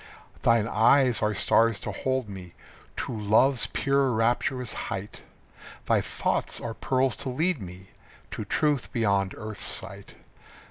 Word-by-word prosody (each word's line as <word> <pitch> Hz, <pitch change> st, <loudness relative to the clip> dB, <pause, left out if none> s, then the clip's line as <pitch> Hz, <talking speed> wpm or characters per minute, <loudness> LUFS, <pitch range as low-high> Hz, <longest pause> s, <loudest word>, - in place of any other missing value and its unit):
Thine 115 Hz, -2 st, +3 dB
eyes 120 Hz, +2 st, +4 dB
are 105 Hz, 0 st, +1 dB
stars 115 Hz, +1 st, +3 dB
to -, -, -4 dB
hold 130 Hz, -3 st, -2 dB
me 95 Hz, -3 st, -10 dB, 0.4 s
To -, -, -3 dB
love's 110 Hz, +5 st, +3 dB
pure 140 Hz, -1 st, +1 dB
rapturous 120 Hz, +2 st, 0 dB, 0.2 s
height. 95 Hz, +2 st, -6 dB, 0.6 s
Thy -, -, +3 dB
thoughts -, -, -2 dB
are 115 Hz, -, -5 dB
pearls 130 Hz, 0 st, 0 dB
to 135 Hz, -, -3 dB
lead 160 Hz, +2 st, 0 dB
me 95 Hz, +1 st, -10 dB, 0.4 s
To -, -, -4 dB
truth 145 Hz, +6 st, 0 dB
beyond 100 Hz, -4 st, +1 dB
earth's 110 Hz, -1 st, -7 dB
sight. -, -, -4 dB
115 Hz, 135 wpm, -26 LUFS, 105-130 Hz, 0.6 s, eyes